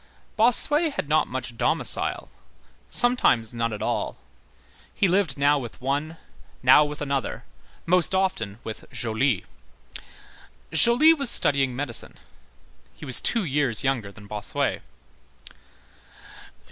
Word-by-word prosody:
Bossuet 290 +7 +3
had - - -4
not - - +1
much - - -6
domicile, - - -1 0.6
sometimes 240 - +1
none 115 -1 -2
at 105 - -6
all. - - -3 0.7
He 200 - 0
lodged 180 -7 0
now 145 +1 +2
with 120 -4 -9
one, 145 +5 -3 0.5
now 150 - +6
with 150 0 -5
another, 140 -2 -3 0.4
most 180 +1 +2
often 115 - -2
with 110 - -9
Joly. 115 -1 -1 1.3
Joly 235 - +5
was 280 -6 -1
studying 135 - +3
medicine. 125 -4 -1 0.8
He - - -11
was 130 - +3
two 230 -3 +2
years 140 - -1
younger 125 -7 -2
than 105 0 -15
Bossuet. 105 0 -3
140 Hz, 115 wpm, -24 LUFS, 120-190 Hz, 1.3 s, now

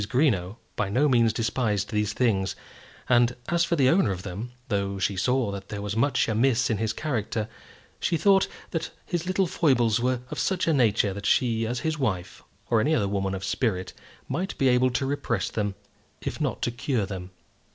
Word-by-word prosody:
Greenow 115 - +1 0.2
by 100 - -1
no 130 +9 +3
means 120 -4 +4
despised 110 -2 -1
these 105 -1 0
things; 100 -6 +1 0.5
and 120 0 +4
as 170 -1 +3
for 170 - +1
the 135 -5 +4
owner 170 - +4
of 90 -1 -5
them, 100 +6 -6 0.2
though 100 -2 -1
she 95 +1 0
saw 125 +2 +1
that 100 0 -7
there 100 - -4
was 105 0 -3
much 125 +2 +2
amiss 120 +2 +2
in 110 - 0
his 110 -1 0
character, 110 -5 -2 0.5
she 165 - +1
thought 195 +3 +4 0.2
that 165 - -2 0.2
his 175 -1 -3
little 185 +1 +2
foibles 125 -10 +2
were 125 0 0
of - - -4
such 190 -2 +1
a 165 - +4
nature 110 -6 +3
that 100 +2 -4
she, 115 -3 +2
as 120 +1 -2
his 160 -1 -1
wife, 95 -9 -2 0.3
or 115 -2 +3
any 155 +7 +2
other 100 -7 +1
woman 95 -1 -1
of 95 - -6
spirit, 95 -2 -1 0.3
might 190 +3 -3
be 135 - +3
able 125 +1 +4
to 125 +2 -1
repress 125 -7 -1
them, 105 -2 -2 0.4
if - - -5
not - - -1
to 120 - +1
cure 120 -3 -1
them. 95 -2 -6
115 Hz, 195 wpm, -26 LUFS, 100-135 Hz, 0.5 s, means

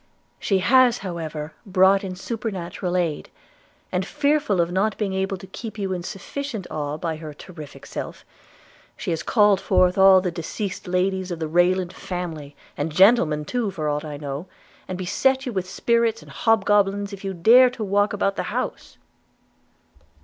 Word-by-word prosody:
She 195 - +1
has 245 +5 +4
however 160 -3 -5
brought 195 0 +4
in 185 -1 -5
supernatural 190 -4 -4
aid; 165 -5 -2 0.6
and, 180 +1 0
fearful 290 -5 +1
of 170 0 +1
not 195 +3 0
being 200 -3 -2
able 190 +1 -1
to 185 - -11
keep 220 +4 -8
you 195 -2 -2
in 180 - -3
sufficient 210 +4 -6
awe 150 -1 -3
by 160 -1 -3
her 155 -2 -9
terrific 155 -3 -11
self, - - -7 0.7
she - - -3
has 165 - -1
called 205 -4 +3
forth 185 0 +2
all 190 -1 +8
the 180 -1 -2
deceased 180 +5 -5
ladies 185 +1 0
of 175 - -4
the 160 -1 -3
Rayland 175 +2 +2
family, 165 -7 -6 0.2
and 145 +3 -2
gentlemen 160 -4 +4
too 235 +4 -1
for 160 -6 -4
aught 150 0 -1
I 150 -2 -6
know, 145 +4 -6 0.4
and 185 - -4
beset 265 +9 +1
you 250 - -4
with 185 -2 -3
spirits 230 +1 +1
and - - -14
hobgoblins 205 -2 +2
if 195 - -9
you 195 -1 -3
dare 240 +9 +7
to 245 -3 -6
walk 205 +1 +2
about 195 -1 -1
the - - -1
house.' - - -4
190 Hz, 170 wpm, -23 LUFS, 170-205 Hz, 0.7 s, all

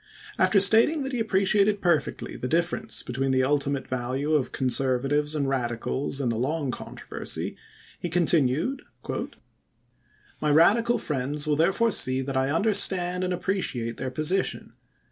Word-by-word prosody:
After 200 - +4
stating 225 +10 +5
that 265 - -4
he 250 - -3
appreciated 205 -1 +2
perfectly 170 -5 -1
the 125 - -4
difference 175 +8 -1
between 130 +2 -2
the 130 0 +2
ultimate 140 -1 -1
value 130 +4 -2
of 140 -4 +1
Conservatives 135 +4 +1
and 140 -2 -1
Radicals 130 +2 -2
in 130 -4 -1
the 115 -1 -2
long 140 +1 -1
controversy, - - -5 0.4
he 175 - -4
continued: 165 - +1 0.8
" - - -33
My 150 - +1
Radical 215 +11 +4
friends 145 +1 -3
will 150 -1 +1
therefore 195 +9 +2
see 130 -6 +2
that 135 0 -5
I 130 +1 +1
understand 180 0 +2
and 185 - -2
appreciate 170 - -2
their 130 - -3
position. 155 +8 -2
150 Hz, 145 wpm, -25 LUFS, 130-190 Hz, 0.8 s, stating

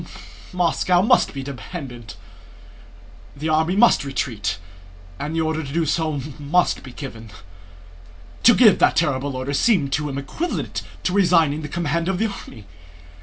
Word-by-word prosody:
Moscow 180 0 +2
must 215 - +3
be 135 - -6
abandoned. 130 -4 -8 1.2
The 150 +3 -3
army 160 +3 +2
must 235 -5 +5
retreat 120 -10 -2 0.6
and 150 +3 -4
the 165 - +1
order 160 0 -1
to 135 - -7
do 165 +2 0
so 155 -1 -1 0.2
must 165 +5 +1
be 130 - -11
given." 115 -5 -9 1.1
To 240 - +7
give 220 -6 +6
that - - +4
terrible 140 -4 0
order 130 +2 -3
seemed 145 -5 +2
to 150 +1 -1
him 135 - -4
equivalent 230 - -3 0.2
to 180 - 0
resigning 165 -6 +3
the 150 - -5
command 170 +1 -1
of 190 - 0
the 220 - +1
army. 115 - -11
155 Hz, 150 wpm, -22 LUFS, 140-175 Hz, 1.2 s, To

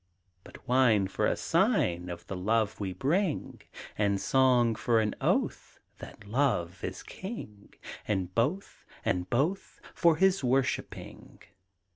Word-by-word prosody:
But - - -15
wine 120 -6 +3
for 95 - 0
a - - 0
sign 90 +1 +1
Of 85 0 -7
the 95 - -6
love 110 +3 0
we 100 -2 -3
bring! 155 - -1 0.4
And 100 -2 +2
song 125 -2 +3
for 115 +1 +1
an 110 -1 0
oath - - -1 0.2
That - - -11
Love 100 -7 -1
is - - -5
king! 145 - -9 0.3
And 95 -3 -1
both, 145 - -1 0.2
and 90 0 -1
both 155 +11 -1
For 170 -2 +4
his 190 0 +2
worshipping! 130 0 -2
115 Hz, 130 wpm, -29 LUFS, 95-135 Hz, 0.4 s, For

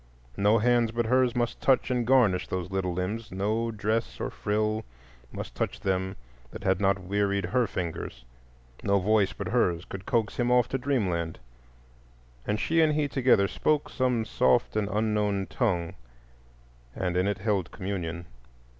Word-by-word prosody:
No 105 +3 +4
hands 120 +1 +3
but 115 +1 -1
hers 125 +1 +2
must 120 -1 -1
touch 130 -1 +3
and 120 -2 0
garnish 115 -9 +4
those 90 0 -4
little 95 -1 -1
limbs; 95 +6 -3
no 105 +5 -1
dress 110 +1 -2
or - - -3
frill 110 +1 -1 0.5
must - - -7
touch - - -3
them 95 -1 -1 0.3
that - - -9
had 95 0 +1
not 100 0 +3
wearied 100 +1 0
her 120 +6 +1
fingers; 80 -10 -5 0.6
no 100 0 +3
voice 100 +1 +2
but - - -5
hers 85 0 +1
could 100 0 -8
coax 115 -3 0
him 120 -1 +1
off 125 -1 +4
to 135 - -1
Dreamland, 95 -12 -1 1.1
and 105 +1 0
she 165 0 +2
and 155 -1 +4
he 150 -1 +1
together 125 -7 +3
spoke 150 +7 0
some 125 -4 0
soft 120 +2 +2
and 105 -2 0
unknown 105 -2 0
tongue 90 -8 -1 1.0
and 90 -2 -2
in 90 +2 +2
it 100 -1 0
held 100 -4 -1
communion. 85 -3 -4
105 Hz, 160 wpm, -27 LUFS, 95-120 Hz, 1.1 s, No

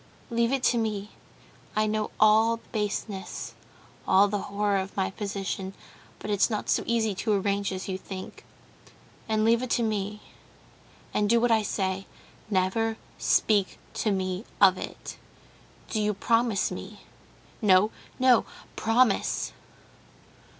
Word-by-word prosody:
Leave 235 +1 +2
it 270 -2 0
to 240 - +3
me. 210 -2 -2 0.6
I 215 0 +3
know 215 0 -1
all 220 +2 +5
the - - -22
baseness, 210 -2 -3 0.5
all 195 +2 +6
the 205 0 -1
horror 205 0 +1
of 190 +1 -6
my 190 -1 0
position; 195 -1 -4 0.4
but 210 - -5
it's 205 +2 +3
not 215 -2 -3
so - - +3
easy 225 -3 +1
to 215 +3 0
arrange 200 0 0
as 185 0 -5
you 190 -1 -3
think. 190 0 -8 0.9
And 215 0 +2
leave 230 +1 +4
it 255 - -3
to 235 - 0
me, 210 -1 -2 0.9
and 205 -1 +1
do 235 +1 +5
what 240 0 +2
I 220 -1 +4
say. 195 -2 -2 0.4
Never 220 +3 +1 0.2
speak 205 -3 +2 0.2
to 220 - +1
me 185 0 -1 0.2
of 190 -2 +7
it. - - -7 0.7
Do 215 - 0
you 210 -1 +1
promise 230 -1 +1
me?... - - -8 0.6
No, 205 0 +5 0.3
no, 255 -3 +5 0.3
promise!..." 225 -1 +2
210 Hz, 140 wpm, -27 LUFS, 195-225 Hz, 0.9 s, of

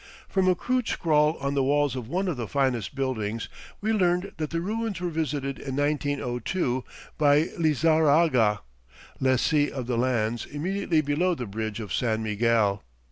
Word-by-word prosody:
From 190 -1 +1
a 185 - +4
crude 250 +4 -1
scrawl 155 -1 +2
on 140 0 -1
the 140 - +1
walls 145 0 +2
of 125 -4 -5
one 185 +8 -1
of 175 - -1
the 120 -3 -4
finest 130 -5 -1
buildings, 115 -5 -2 0.3
we 220 +2 +1
learned 180 -1 +1
that 155 -2 -3
the 165 - -2
ruins 215 +1 -2
were 175 -1 -2
visited 145 -4 -2
in 135 -2 -5
1902 145 - -1 0.4
by 150 +2 +4
Lizarraga, 155 -7 +3 0.6
lessee 135 +3 +2
of 130 -3 -5
the 120 -1 -1
lands 120 -2 0
immediately 165 +2 0
below 160 +5 +1
the 125 - -5
bridge 110 +1 -4
of 105 -4 -5
San 110 -3 0
Miguel. 105 -2 +1
145 Hz, 160 wpm, -26 LUFS, 120-165 Hz, 0.6 s, a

